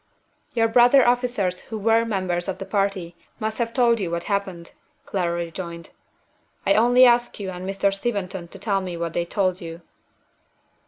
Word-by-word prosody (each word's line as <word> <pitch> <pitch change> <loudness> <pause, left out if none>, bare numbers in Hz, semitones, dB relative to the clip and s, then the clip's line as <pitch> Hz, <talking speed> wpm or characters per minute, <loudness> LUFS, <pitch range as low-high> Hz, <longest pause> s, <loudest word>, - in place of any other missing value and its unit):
"Your 225 -1 +3
brother 245 +4 +5
officers 240 -7 +1
who 220 - -7
were 225 +2 +3
members 185 -5 -2
of 190 - -3
the 195 - -6
party 195 -4 -1 0.2
must 220 0 -3
have 230 -1 -1
told 235 -2 +3
you 185 -4 -2
what 170 0 -3
happened," 190 -4 -3 0.3
Clara 175 -3 -1
rejoined. 170 0 -8 0.7
"I - - +4
only 245 +1 +6
ask 240 -1 +3
you 195 -2 -4
and 185 +1 -6
Mr. 195 0 +1
Steventon 195 -4 -3
to 195 - -9
tell 200 0 -1
me 180 -2 -5
what 170 -1 -3
they 170 - -1
told 185 0 -1
you." 165 0 -8
195 Hz, 170 wpm, -23 LUFS, 180-230 Hz, 0.7 s, only